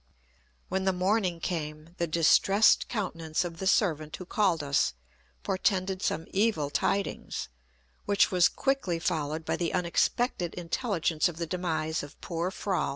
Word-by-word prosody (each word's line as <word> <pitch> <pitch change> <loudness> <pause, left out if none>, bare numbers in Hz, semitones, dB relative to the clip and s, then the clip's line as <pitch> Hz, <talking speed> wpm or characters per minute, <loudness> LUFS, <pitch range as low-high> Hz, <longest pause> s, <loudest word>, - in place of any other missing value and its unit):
When 190 +1 -1
the 190 - +3
morning 185 -1 +1
came, 155 -1 -4
the 170 - +1
distressed 170 +6 +4
countenance 165 -7 -2
of 165 -2 -7
the 190 - -2
servant 155 -7 +1
who 185 - -8
called 180 -5 +1
us, 140 - +1 0.5
portended 190 -2 0
some 165 - -1
evil 190 -9 +1
tidings, 195 - -1 0.6
which 205 0 +3
was 180 -2 +5
quickly 270 -11 0
followed 160 -2 -2
by - - -1
the 170 0 -1
unexpected 180 +2 0
intelligence 175 -3 0
of 165 - -9
the 170 - -2
demise 165 -2 -2
of 145 -1 -11
poor 170 +1 -2
Froll. 190 -4 -1
175 Hz, 145 wpm, -29 LUFS, 160-195 Hz, 0.6 s, was